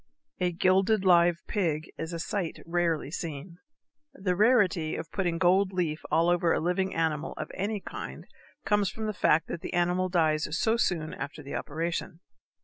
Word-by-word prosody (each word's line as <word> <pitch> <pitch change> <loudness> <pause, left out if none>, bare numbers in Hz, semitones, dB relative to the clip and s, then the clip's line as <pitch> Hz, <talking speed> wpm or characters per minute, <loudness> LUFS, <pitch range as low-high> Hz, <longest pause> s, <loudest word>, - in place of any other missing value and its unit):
_ - - +2
A - - 0
gilded 190 +3 +2
live 175 -2 +4
pig 165 -6 -1
is 160 +1 -5
a 170 - -3
sight 175 0 -3
rarely 165 -4 0
seen. 165 +1 -6 0.6
The 185 -2 -1
rarity 195 -7 +3
of 160 - -6
putting 175 -4 -1
gold 185 +2 +3
leaf 170 -4 -1
all 165 +1 +3
over 175 -1 +3
a - - +2
living 180 +3 0
animal 160 -2 -1
of - - -6
any 205 +3 -2
kind - - -7 0.4
comes 205 -3 +2
from 220 - -5
the 215 - -1
fact 165 -4 +2
that 170 - -4
the - - -5
animal 180 +1 +1
dies 155 -4 +2
so 225 +5 +2
soon 165 -9 0
after 145 +2 -6
the 140 - -8
operation. 165 +2 -3
175 Hz, 175 wpm, -28 LUFS, 160-190 Hz, 0.6 s, live